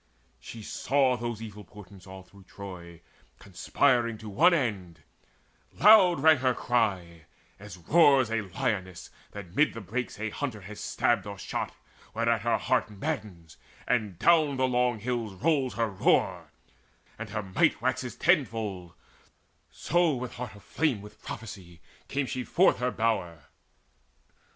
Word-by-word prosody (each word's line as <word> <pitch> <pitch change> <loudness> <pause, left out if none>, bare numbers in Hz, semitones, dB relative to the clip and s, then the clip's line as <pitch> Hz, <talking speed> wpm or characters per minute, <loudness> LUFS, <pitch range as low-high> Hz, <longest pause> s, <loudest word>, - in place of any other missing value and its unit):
She 115 -2 -10
saw 135 +3 +1
those 120 -2 -5
evil 105 -1 -9
portents 100 0 -15
all 95 0 -10
through 95 +1 -19
Troy 90 -4 -10 0.4
Conspiring 115 +5 0
to 110 0 -9
one 105 - +4
end; 100 - -2 0.7
loud 190 -5 +6
rang 160 -1 +7
her 130 -1 +1
cry, 95 -10 -1 0.3
As 100 -2 -10
roars 135 - +4
a 115 -1 0
lioness 95 -1 -4 0.2
that 95 -4 -10
mid 150 -4 +2
the - - -5
brakes 110 +4 -5
A 110 0 -3
hunter 125 -6 -4
has 105 +3 -10
stabbed 95 - 0
or 100 0 -7
shot, - - -5 0.4
whereat 115 -1 +1
her 120 +2 +1
heart 125 -4 0
Maddens, 105 - -6 0.3
and 110 -7 0
down 155 - +3
the 130 0 +2
long 125 -2 +1
hills 115 -2 -3
rolls 140 - 0
her 115 -2 -1
roar, 95 - +1 0.7
And - - -6
her 105 - -4
might 95 -1 +1
waxes 130 +1 -2
tenfold; 110 - 0 0.7
so 175 -4 +1
with 125 0 -6
heart 120 -4 -7
Aflame 115 - -2
with 105 +1 -14
prophecy 90 -6 -9 0.3
came 140 0 -1
she 130 0 -4
forth 185 +9 +3
her 125 +1 0
bower. 110 - -2
110 Hz, 140 wpm, -28 LUFS, 100-130 Hz, 0.7 s, rang